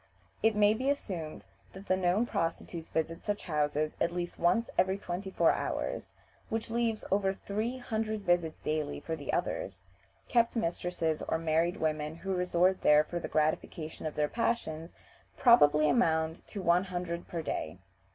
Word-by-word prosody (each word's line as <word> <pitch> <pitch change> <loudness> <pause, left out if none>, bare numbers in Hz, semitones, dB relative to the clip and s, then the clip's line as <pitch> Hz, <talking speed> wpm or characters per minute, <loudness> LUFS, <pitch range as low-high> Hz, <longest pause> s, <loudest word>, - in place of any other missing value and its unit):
It 220 -1 +3
may 210 0 +5
be 255 +5 -1
assumed 180 - -3 0.3
that 190 +1 -10
the 185 - +3
known 185 +5 +2
prostitutes 165 -3 -3
visit 165 +2 -2
such 205 -1 -2
houses 150 -1 0
at 170 - +2
least 175 0 -4
once 230 +7 +3
every 190 +1 +2
twenty 190 0 -5
four - - +4
hours, - - -3 0.3
which 225 0 -3
leaves 230 -2 0
over 195 0 +2
three 220 +7 -3
hundred 220 -3 -2
visits 175 -4 +1
daily 150 -1 -1
for 160 +2 -4
the 145 -3 -4
others. 95 -1 -2 0.4
Kept 235 0 +2
mistresses 170 -5 -1
or - - +1
married 165 +2 +1
women 155 0 -1
who 190 +3 -3
resort 180 +1 +2
there 150 0 +6
for 175 +3 -4
the - - -4
gratification 155 +1 -1
of 155 - -6
their 150 -1 +2
passions 165 -7 -2 0.4
probably 155 - +6
amount 160 -6 +1
to 200 - -6
one 175 +2 +4
hundred 175 -2 -4
per 170 -2 -4
day. 80 - -3
175 Hz, 160 wpm, -31 LUFS, 160-205 Hz, 0.4 s, there